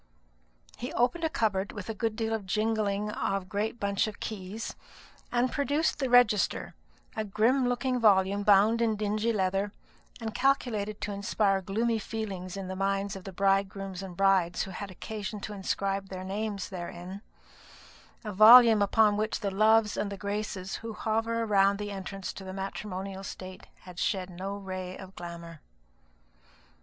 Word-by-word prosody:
He 250 Hz, -, -4 dB
opened 255 Hz, +9 st, +1 dB
a 320 Hz, -, +2 dB
cupboard, 205 Hz, -7 st, 0 dB
with 205 Hz, -4 st, -7 dB
a 225 Hz, -, -3 dB
good 225 Hz, 0 st, -2 dB
deal 225 Hz, 0 st, -1 dB
of 210 Hz, -4 st, -3 dB
jingling 210 Hz, 0 st, 0 dB
of 195 Hz, -2 st, -1 dB
a -, -, -17 dB
great 215 Hz, +4 st, -3 dB
bunch 200 Hz, +1 st, +1 dB
of 215 Hz, -, -7 dB
keys, 210 Hz, +1 st, -5 dB, 0.6 s
and 245 Hz, +1 st, +1 dB
produced 295 Hz, +2 st, 0 dB
the 265 Hz, -2 st, 0 dB
register; 240 Hz, -5 st, +3 dB, 0.4 s
a 220 Hz, -, -1 dB
grim 235 Hz, +5 st, +2 dB
looking 250 Hz, +1 st, 0 dB
volume 200 Hz, -2 st, +4 dB
bound 210 Hz, +3 st, +5 dB
in 225 Hz, -2 st, +2 dB
dingy 215 Hz, +2 st, 0 dB
leather, 195 Hz, -1 st, 0 dB, 0.5 s
and 225 Hz, -2 st, -4 dB
calculated 225 Hz, -6 st, 0 dB
to 210 Hz, -, -3 dB
inspire 200 Hz, 0 st, +1 dB
gloomy 225 Hz, +4 st, 0 dB
feelings 195 Hz, -5 st, -5 dB
in 195 Hz, -1 st, -5 dB
the 190 Hz, -, -4 dB
minds 195 Hz, +1 st, -1 dB
of 190 Hz, -, -9 dB
the 195 Hz, -, -6 dB
bridegrooms 195 Hz, 0 st, 0 dB
and 185 Hz, -3 st, -8 dB
brides 190 Hz, -3 st, +3 dB
who 190 Hz, -, -7 dB
had 200 Hz, +2 st, -6 dB
occasion 210 Hz, +2 st, -6 dB
to 210 Hz, -, -5 dB
inscribe 195 Hz, 0 st, -2 dB
their 185 Hz, -1 st, -6 dB
names 200 Hz, 0 st, -3 dB
therein; 180 Hz, +1 st, -7 dB, 1.0 s
a 210 Hz, -, -4 dB
volume 225 Hz, +2 st, +9 dB
upon 205 Hz, +1 st, +4 dB
which 215 Hz, +2 st, -1 dB
the 200 Hz, -2 st, -1 dB
loves 215 Hz, +2 st, +4 dB
and 200 Hz, -, -1 dB
the 200 Hz, -, -5 dB
graces 200 Hz, -2 st, -3 dB
who 225 Hz, -1 st, -7 dB
hover 225 Hz, +1 st, -1 dB
around 200 Hz, -2 st, +3 dB
the 205 Hz, 0 st, -4 dB
entrance 195 Hz, 0 st, -5 dB
to 195 Hz, -, -9 dB
the 185 Hz, 0 st, -7 dB
matrimonial 195 Hz, 0 st, -5 dB
state 185 Hz, -1 st, -8 dB
had 180 Hz, -1 st, -10 dB
shed 185 Hz, -3 st, -1 dB
no 190 Hz, +3 st, -5 dB
ray 185 Hz, -2 st, -6 dB
of 190 Hz, 0 st, -11 dB
glamour. 170 Hz, -2 st, -8 dB
200 Hz, 165 wpm, -29 LUFS, 195-220 Hz, 1.0 s, volume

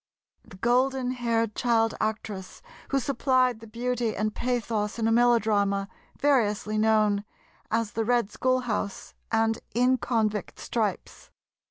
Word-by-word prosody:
the 185 Hz, -, -14 dB
golden 255 Hz, +3 st, +1 dB
haired 230 Hz, -3 st, 0 dB
child 225 Hz, -1 st, +2 dB
actress 215 Hz, -, -4 dB, 0.3 s
who 275 Hz, -, +2 dB
supplied 255 Hz, -2 st, +1 dB
the 225 Hz, -, -12 dB
beauty 235 Hz, 0 st, -2 dB
and 215 Hz, +1 st, -1 dB
pathos 230 Hz, -4 st, -1 dB
in 225 Hz, -1 st, 0 dB
a -, -, +2 dB
melodrama 215 Hz, -4 st, +3 dB, 0.3 s
variously 215 Hz, -7 st, +1 dB
known 215 Hz, -2 st, +3 dB, 0.5 s
as 225 Hz, -1 st, 0 dB
"The 225 Hz, -, -1 dB
Red 235 Hz, -2 st, +1 dB
Schoolhouse" 250 Hz, -6 st, -1 dB, 0.2 s
and 225 Hz, 0 st, +2 dB, 0.2 s
"In 250 Hz, +2 st, +3 dB
Convict 215 Hz, -5 st, -1 dB
Stripes." 215 Hz, -5 st, -3 dB
225 Hz, 125 wpm, -27 LUFS, 215-245 Hz, 0.5 s, melodrama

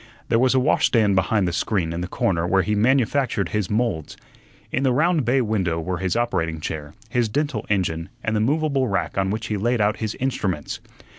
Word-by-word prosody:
There 115 Hz, -, +3 dB
was 130 Hz, +1 st, +3 dB
a -, -, +5 dB
washstand 115 Hz, -6 st, +3 dB
behind 95 Hz, +1 st, +2 dB
the 85 Hz, -, -2 dB
screen 90 Hz, -3 st, 0 dB
in 85 Hz, -, -3 dB
the 90 Hz, -, -3 dB
corner 85 Hz, -2 st, 0 dB
where 95 Hz, +1 st, +3 dB
he 105 Hz, -, -1 dB
manufactured 125 Hz, 0 st, +2 dB
his 105 Hz, -3 st, -1 dB
moulds. 105 Hz, -8 st, -1 dB, 0.5 s
In 125 Hz, -, 0 dB
the 135 Hz, -2 st, +3 dB
round 155 Hz, +2 st, +2 dB
bay 130 Hz, +3 st, +3 dB
window 95 Hz, -8 st, 0 dB
were 90 Hz, +2 st, -3 dB
his 95 Hz, -2 st, -1 dB
operating 85 Hz, -10 st, 0 dB
chair, 75 Hz, -1 st, -5 dB
his 120 Hz, -1 st, +1 dB
dental 145 Hz, +6 st, -2 dB
engine, 90 Hz, -4 st, -1 dB
and 110 Hz, -, 0 dB
the -, -, +2 dB
movable 140 Hz, +2 st, +1 dB
rack 100 Hz, -, -1 dB
on 95 Hz, 0 st, +1 dB
which 110 Hz, +3 st, -2 dB
he 105 Hz, -, -2 dB
laid 120 Hz, +4 st, 0 dB
out 105 Hz, +1 st, +2 dB
his 110 Hz, -1 st, -3 dB
instruments. 95 Hz, -, -2 dB
105 Hz, 205 wpm, -23 LUFS, 90-125 Hz, 0.5 s, a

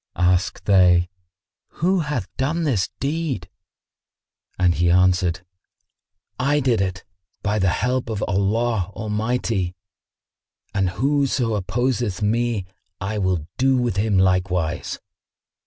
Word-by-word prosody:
Asked 90 Hz, +1 st, +1 dB
they, 90 Hz, -3 st, +5 dB, 0.6 s
"Who 185 Hz, +4 st, +1 dB
hath 145 Hz, -, -2 dB
done 155 Hz, +6 st, -1 dB
this 120 Hz, -, +1 dB
deed?"; 140 Hz, -, -2 dB, 1.1 s
and 90 Hz, -2 st, +3 dB
he 85 Hz, +1 st, +2 dB
answered, 90 Hz, -1 st, +3 dB, 1.0 s
"I 140 Hz, +3 st, +2 dB
did 125 Hz, -6 st, +2 dB
it, 95 Hz, -2 st, -2 dB, 0.4 s
by 105 Hz, +1 st, 0 dB
the 95 Hz, -1 st, +3 dB
help 125 Hz, +6 st, 0 dB
of 105 Hz, -2 st, -2 dB
Allah 100 Hz, +1 st, 0 dB
Almighty; 105 Hz, -3 st, -1 dB, 1.0 s
and 95 Hz, -2 st, +1 dB
whoso 130 Hz, +2 st, +1 dB
opposeth 115 Hz, 0 st, -1 dB
me, 115 Hz, -1 st, 0 dB, 0.3 s
I 105 Hz, +2 st, -3 dB
will 90 Hz, -5 st, 0 dB
do 130 Hz, 0 st, +3 dB
with 120 Hz, -5 st, 0 dB
him 100 Hz, -1 st, +2 dB
likewise." 90 Hz, -3 st, 0 dB
105 Hz, 110 wpm, -22 LUFS, 90-125 Hz, 1.1 s, they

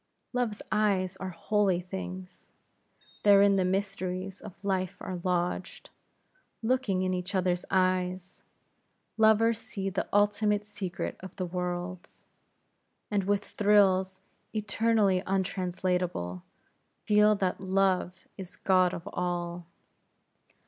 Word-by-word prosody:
Love's 240 Hz, -4 st, -1 dB
eyes 195 Hz, -3 st, +1 dB
are 190 Hz, -, -5 dB
holy 190 Hz, +1 st, +1 dB
things; 185 Hz, 0 st, -8 dB, 0.7 s
therein 200 Hz, -1 st, +6 dB
the 190 Hz, -, +2 dB
mysteries 190 Hz, 0 st, -2 dB
of 200 Hz, -1 st, -11 dB
life 185 Hz, -2 st, -1 dB
are 180 Hz, -2 st, -5 dB
lodged; 180 Hz, 0 st, -2 dB, 0.7 s
looking 225 Hz, -6 st, +1 dB
in 185 Hz, 0 st, 0 dB
each 180 Hz, +2 st, -3 dB
other's 180 Hz, -1 st, +1 dB
eyes, 185 Hz, -1 st, 0 dB, 0.7 s
lovers 220 Hz, 0 st, +4 dB
see 195 Hz, -3 st, -4 dB
the -, -, -2 dB
ultimate 205 Hz, 0 st, +2 dB
secret 200 Hz, -4 st, -5 dB
of 190 Hz, -, -10 dB
the 185 Hz, -, -3 dB
worlds; 180 Hz, 0 st, -5 dB, 0.9 s
and 200 Hz, -2 st, +1 dB
with 205 Hz, +1 st, +1 dB
thrills 190 Hz, -2 st, +3 dB, 0.3 s
eternally 215 Hz, -2 st, +2 dB
untranslatable, 180 Hz, -, -1 dB, 0.6 s
feel 210 Hz, 0 st, +5 dB
that 190 Hz, -2 st, -1 dB
Love 190 Hz, -1 st, 0 dB
is 185 Hz, -2 st, -8 dB
god 185 Hz, -2 st, +3 dB
of 170 Hz, +3 st, -8 dB
all. 175 Hz, -1 st, -3 dB
190 Hz, 105 wpm, -29 LUFS, 180-205 Hz, 0.9 s, therein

